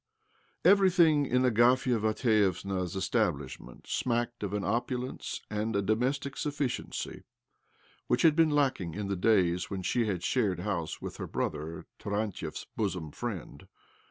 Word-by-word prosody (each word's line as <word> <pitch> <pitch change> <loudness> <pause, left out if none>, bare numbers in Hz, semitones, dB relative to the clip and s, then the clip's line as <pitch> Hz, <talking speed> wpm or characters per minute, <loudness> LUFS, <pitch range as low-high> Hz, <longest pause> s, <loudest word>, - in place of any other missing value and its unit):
Everything 175 -7 +5
in 125 +1 +2
Agafia 125 +1 +4
Mat 110 0 +1
vievna's 95 -5 +1
establishment 95 - -2
smacked 120 -1 -1
of 100 -2 -3
an 105 -1 -2
opu 120 +5 0
lence 130 - -6
and 105 +1 -2
a 100 - +2
domestic 130 +6 0
sufficiency 145 -3 -3 0.9
which 125 - +2
had 160 -3 +6
been 165 -1 +5
lacking 135 - +1
in 105 -1 -3
the 100 - 0
days 90 -3 +2
when 95 -2 -4
she 115 +4 +1
had 90 -4 -2
shared 100 -9 +1
house 85 -5 -3
with - - -6
her - - -5
brother, 75 +2 -3
Tarantiev's 100 -6 -3
bosom 90 -7 -2
friend. 105 -6 -6
110 Hz, 140 wpm, -30 LUFS, 95-125 Hz, 0.9 s, had